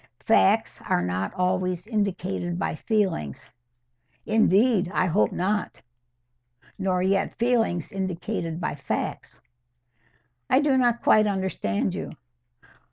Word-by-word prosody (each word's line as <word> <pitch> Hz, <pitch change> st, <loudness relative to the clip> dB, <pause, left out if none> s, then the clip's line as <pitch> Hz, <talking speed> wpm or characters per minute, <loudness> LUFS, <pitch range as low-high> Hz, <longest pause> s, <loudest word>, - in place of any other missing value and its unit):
"Facts -, -, +3 dB
are 90 Hz, -, +2 dB
not 90 Hz, +2 st, -2 dB
always 180 Hz, 0 st, -1 dB
indicated 195 Hz, -5 st, -2 dB
by -, -, -1 dB
feelings." 180 Hz, -, -2 dB, 0.7 s
"Indeed, 215 Hz, -2 st, +3 dB
I 185 Hz, -, +1 dB
hope 185 Hz, +4 st, +2 dB
not; 205 Hz, +4 st, -2 dB, 1.0 s
nor 185 Hz, -2 st, 0 dB
yet 195 Hz, +1 st, +1 dB
feelings 230 Hz, -8 st, 0 dB
indicated 185 Hz, -3 st, -3 dB
by 180 Hz, -, -2 dB
facts." 140 Hz, -2 st, -4 dB, 1.1 s
"I 260 Hz, -, +5 dB
do 290 Hz, -2 st, +2 dB
not 240 Hz, -2 st, +2 dB
quite 215 Hz, 0 st, +5 dB
understand 190 Hz, -, -1 dB
you." -, -, -5 dB
190 Hz, 105 wpm, -25 LUFS, 175-215 Hz, 1.1 s, I